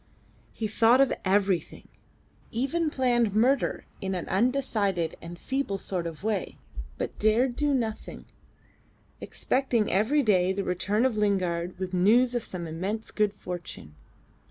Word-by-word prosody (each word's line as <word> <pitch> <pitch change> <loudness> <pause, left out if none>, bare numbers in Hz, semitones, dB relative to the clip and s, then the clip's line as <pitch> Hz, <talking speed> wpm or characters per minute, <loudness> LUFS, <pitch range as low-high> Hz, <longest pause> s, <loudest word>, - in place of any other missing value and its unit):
He 220 - -3
thought 230 +4 +4
of 275 -1 +4
everything; 195 -2 0 0.6
even 275 +8 -1
planned 240 -6 +1
murder 250 +4 +2 0.2
in 190 -1 -2
an 180 - -4
undecided 205 -6 0
and 170 +1 -8
feeble 265 -3 -2
sort 180 -3 -2
of 165 +2 -8
way, 210 -3 -2 0.4
but - - -5
dared 235 +4 +2
do 295 +1 +1
nothing 230 -5 -3 0.9
expecting 250 -5 0
every 225 +10 +2
day 190 -4 +3
the 200 +1 -2
return 200 +6 0
of 245 -5 0
Lingard 180 -4 0
with 185 0 -5
news 230 +8 +4
of 240 - 0
some 180 -5 -5
immense 190 +7 -4
good 210 -1 +1
fortune. 175 - -8
210 Hz, 135 wpm, -27 LUFS, 185-245 Hz, 0.9 s, thought